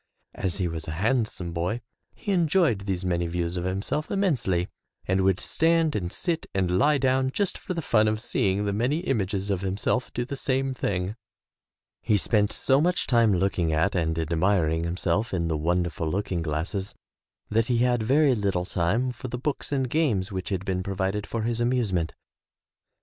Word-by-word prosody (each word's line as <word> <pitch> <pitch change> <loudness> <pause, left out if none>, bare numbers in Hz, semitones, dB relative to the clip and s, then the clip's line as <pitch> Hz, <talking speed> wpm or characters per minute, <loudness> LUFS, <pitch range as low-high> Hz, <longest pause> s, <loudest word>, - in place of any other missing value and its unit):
As 95 -2 -2
he 95 -3 0
was 80 -2 -5
a 75 - -3
handsome 105 -5 0
boy 90 +7 -1 0.4
he 205 - -4
enjoyed 165 - +2
these 95 -1 -1
many 85 -1 0
views 85 +1 -2
of 90 0 -2
himself 100 +11 -2
immensely, 130 - +1 0.4
and 95 +1 +2
would 95 0 +2
stand 165 -1 +2
and 90 -4 -2
sit 170 -3 -2
and 90 -2 +1
lie 145 +2 +4
down 130 -1 +2
just 200 +7 0
for 185 - -5
the 165 - -3
fun 110 -4 +3
of 110 0 0
seeing 100 -3 0
the 100 - 0
many 125 +10 0
images 100 - -1
of 95 -2 -1
himself 100 +6 -1
do 120 - -2
the 140 - -5
same 135 0 0
thing. 95 -4 -2 0.9
He 110 -2 +2
spent 105 +1 +1
so 135 +1 +2
much 180 +2 +1
time 115 -3 +4
looking 90 -3 +1
at 80 +1 +2
and 80 -2 0
admiring 80 0 +1
himself 90 +4 0
in 85 -2 -1
the 80 - 0
wonderful 85 +1 0
looking 90 -1 -1
glasses 80 +5 -3 0.6
that 115 +1 +2
he 120 - +2
had 120 -2 +2
very 135 +4 +4
Httle 95 -4 -1
time 110 +9 +1
for 125 +2 -7
the 125 - -4
books 140 +3 -3
and 135 -2 +1
games 120 -10 +1
which 95 -1 -4
had 95 -1 -2
been 95 -2 -1
provided 95 +2 -2
for 115 -1 -3
his 115 +1 -1
amuse 120 -4 +1
ment. 85 -2 -1
100 Hz, 185 wpm, -26 LUFS, 90-130 Hz, 0.9 s, lie